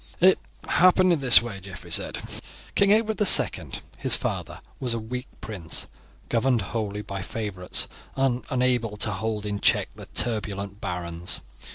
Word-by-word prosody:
"It 185 +2 +5 0.3
happened 185 0 +4
in 165 - 0
this 125 -3 +8
way," 110 -5 -6
Geoffrey 95 -3 -11
said. - - 0 0.6
"King 200 0 +3
Edward 220 0 +2
II, 205 - +5 0.3
his - - +5
father, - - -4 0.2
was 125 -3 0
a - - -3
weak 125 +4 -6
prince, 95 -8 -4 0.4
governed 120 -1 +1
wholly 105 0 -4
by 100 -1 -6
favourites, 95 -3 -2 0.3
and 135 -2 0
unable 125 -5 0
to - - +2
hold 105 +2 -3
in 105 -1 -3
check - - +2
the - - -12
turbulent 100 -3 0
barons. 85 -2 -3
110 Hz, 150 wpm, -25 LUFS, 100-130 Hz, 0.6 s, this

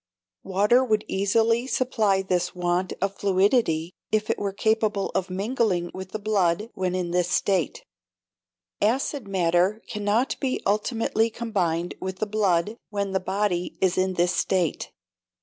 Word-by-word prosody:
Water 205 +7 +3
would 215 -4 +1
easily 225 +5 +2
supply 215 -7 +1
this 180 -1 -1
want 180 +1 0
of 195 0 -1
fluidity 190 -4 +2 0.2
if 215 0 +1
it - - -2
were 200 -1 -1
capable 215 0 0
of 190 - -1
mingling 195 -2 0
with 190 0 -7
the 215 - -3
blood 205 0 0
when 185 -1 -1
in 180 -2 -2
this 175 0 +1
state; 180 -2 0 1.0
acid 245 +2 0
matter 185 +2 +2
cannot 210 +4 0
be 265 -2 -1
ultimately 225 +2 +1
combined 180 -8 -1
with 190 0 -4
the 215 - -1
blood 205 -1 +1
when 200 -2 -2
the 190 - +1
body 190 -1 -1
is 185 -1 +2
in 185 0 0
this 175 +1 +2
state. 180 -5 0
195 Hz, 145 wpm, -25 LUFS, 180-215 Hz, 1.0 s, Water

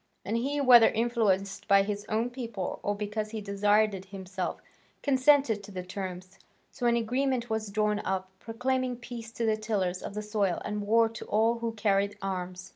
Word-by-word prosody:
And 215 - -1
he, 275 +5 -1
whether 245 -4 +8
influenced 210 -4 0
by 200 0 +6
his 205 0 -4
own 225 +3 0
people 230 -7 -4
or 205 - -1
because 210 +1 -3
he 220 0 -5
desired 205 +1 +2
it 190 -1 -7
himself, 190 -1 -5 0.4
consented 270 -5 +4
to 205 - -10
the 185 -2 -5
terms. 185 0 -7 0.3
So 245 - -1
an 235 - +4
agreement 245 +1 0
was 220 -1 -1
drawn 210 0 +1
up, 190 -1 -3
proclaiming 250 +3 -1
peace 235 -2 -8
to 235 - -2
the 220 -1 +2
tillers 200 -5 -1
of 200 - -7
the 210 - -3
soil 205 -4 0
and 210 0 -2
war 230 +1 +5
to 225 - -8
all 225 +2 +2
who 230 -1 -2
carried 205 -1 +1
arms. 185 -1 -5
215 Hz, 185 wpm, -29 LUFS, 195-230 Hz, 0.4 s, whether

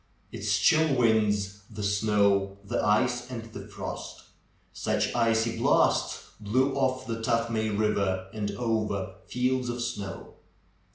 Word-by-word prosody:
Its 105 0 0
chill 155 - +4
winds, 105 -4 +2
the 105 -1 -6
snow, 100 -1 +2
the - - -1
ice, 120 +4 +2
and 120 -3 -5
the - - -8
frost! - - -7 0.5
Such 105 -1 -1
icy 115 -1 +1
blasts - - +2
blew 130 +6 +1
off 130 -1 0
the 115 -2 -4
Tuthmay 115 -1 0
Eiver 100 -3 +1
and 105 -2 -2
over 105 -4 -2
fields 125 0 0
of 120 0 -3
snow. 105 -5 -5
110 Hz, 125 wpm, -28 LUFS, 100-120 Hz, 0.5 s, chill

